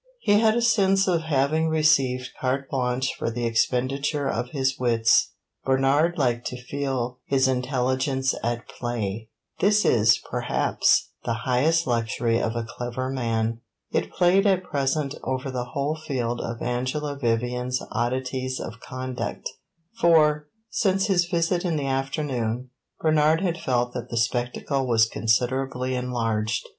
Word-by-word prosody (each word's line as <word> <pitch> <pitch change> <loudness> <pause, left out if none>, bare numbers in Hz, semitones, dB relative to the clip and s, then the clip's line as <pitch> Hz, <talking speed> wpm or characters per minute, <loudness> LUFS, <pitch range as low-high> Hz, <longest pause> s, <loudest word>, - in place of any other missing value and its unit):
He 205 0 +4
had 220 0 +4
a 240 - +1
sense 195 -4 +3
of 170 -3 +2
having 155 +1 +1
received 140 -5 +2
carte 135 +1 -1
blanche 130 0 0
for - - -3
the 120 +1 -3
expenditure 130 +5 0
of 125 -1 -2
his 135 -1 -1
wits. 115 -2 +3 0.3
Bernard 135 +6 +2
liked 120 -4 0
to 125 - -6
feel 125 -2 -3
his 135 -1 +2
intelligence 130 +1 0
at 120 0 -2
play; 110 -3 -4 0.3
this 210 +2 +3
is, 110 -2 +5
perhaps, - - +1
the 115 - -1
highest 155 +7 +2
luxury 115 -1 0
of 115 +1 -1
a 115 -1 -2
clever 125 +2 -4
man. 115 -3 -1 0.3
It - - 0
played 190 +3 +3
at 185 -2 +2
present 140 -2 -1
over 130 +1 -2
the 125 -1 -3
whole 140 +4 -2
field 120 -4 -1
of 115 0 -5
Angela 130 +4 -2
Vivian's 125 0 -1
oddities 130 +1 -2
of 115 - -7
conduct 130 +1 -5 0.5
for, 150 -4 +4 0.2
since 195 -1 +1
his 185 -4 +2
visit 170 +1 0
in 175 -3 0
the 145 -2 -2
afternoon, 130 -3 -2 0.3
Bernard 155 +1 +3
had 175 -3 -1
felt 125 -1 0
that 125 -1 -6
the 115 - -3
spectacle 125 +4 -1
was 115 -2 +4
considerably 125 +3 0
enlarged. 115 -4 -1
130 Hz, 140 wpm, -25 LUFS, 120-150 Hz, 0.5 s, is